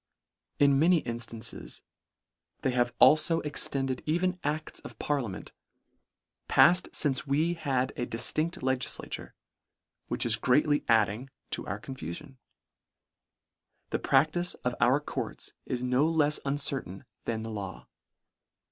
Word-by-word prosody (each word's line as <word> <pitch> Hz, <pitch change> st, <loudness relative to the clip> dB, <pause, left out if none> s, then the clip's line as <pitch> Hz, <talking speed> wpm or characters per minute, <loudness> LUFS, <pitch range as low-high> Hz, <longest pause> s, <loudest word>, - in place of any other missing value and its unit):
In 140 Hz, -1 st, +4 dB
many 165 Hz, +1 st, +4 dB
inftances 115 Hz, -1 st, -4 dB, 0.8 s
they 130 Hz, -, +2 dB
have 120 Hz, -1 st, +1 dB
al -, -, +8 dB
fo 155 Hz, +2 st, +1 dB
extended 135 Hz, -3 st, -1 dB
even 180 Hz, +3 st, 0 dB
acts 155 Hz, +2 st, -3 dB
of -, -, -11 dB
parliament, 125 Hz, -10 st, -3 dB, 1.0 s
palled 180 Hz, +2 st, +5 dB
lince 140 Hz, -1 st, +1 dB
we 155 Hz, +5 st, +1 dB
had 135 Hz, -5 st, -1 dB
a 120 Hz, -, -3 dB
diftindt 155 Hz, +7 st, 0 dB
legislature, 130 Hz, -1 st, -2 dB, 0.7 s
which -, -, -2 dB
is 115 Hz, -1 st, +5 dB
greatly 145 Hz, +5 st, +2 dB
adding 110 Hz, +3 st, +2 dB, 0.2 s
to -, -, -3 dB
our -, -, -4 dB
confufion. 135 Hz, -, -8 dB, 1.5 s
The -, -, 0 dB
prac 140 Hz, +3 st, +3 dB
tice 175 Hz, +1 st, -1 dB
of 125 Hz, -, +1 dB
our 125 Hz, +6 st, +4 dB
courts 150 Hz, -, -6 dB
is 125 Hz, -1 st, -2 dB
no 125 Hz, +5 st, +2 dB
lefs 150 Hz, -2 st, +2 dB
uncertain 140 Hz, -8 st, -1 dB, 0.2 s
than 110 Hz, -1 st, -2 dB
the 110 Hz, -, -6 dB
law. 100 Hz, -3 st, -6 dB
135 Hz, 125 wpm, -29 LUFS, 120-155 Hz, 1.5 s, al